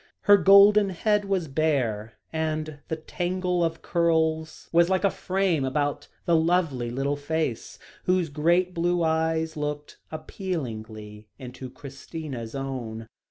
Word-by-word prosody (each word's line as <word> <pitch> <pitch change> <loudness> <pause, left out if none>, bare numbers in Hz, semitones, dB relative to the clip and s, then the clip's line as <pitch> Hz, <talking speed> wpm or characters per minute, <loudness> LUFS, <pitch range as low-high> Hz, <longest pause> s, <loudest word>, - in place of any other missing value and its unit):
Her 205 - +7
golden 200 +1 +6
head 205 +3 +1
was 190 -4 -1
bare, 130 -8 -1 0.2
and 155 -1 -2
the 160 - -2
tangle 180 +2 -2
of 165 -1 -2
curls 160 -2 0
was 170 +1 +4
like 190 0 +1
a 200 - +3
frame 185 -6 0
about 145 +2 -1 0.2
the 170 - +3
lovely 160 -7 +1
little 135 +4 -1
face, 145 -4 -3 0.3
whose 180 -3 +1
great 170 +5 +1
blue 175 0 +1
eyes 160 0 0
looked 150 -1 -5
appealingly 110 - -6
into 130 0 -8
Christina's 135 -3 -8
own. 120 -5 -5
160 Hz, 125 wpm, -26 LUFS, 135-175 Hz, 0.3 s, Her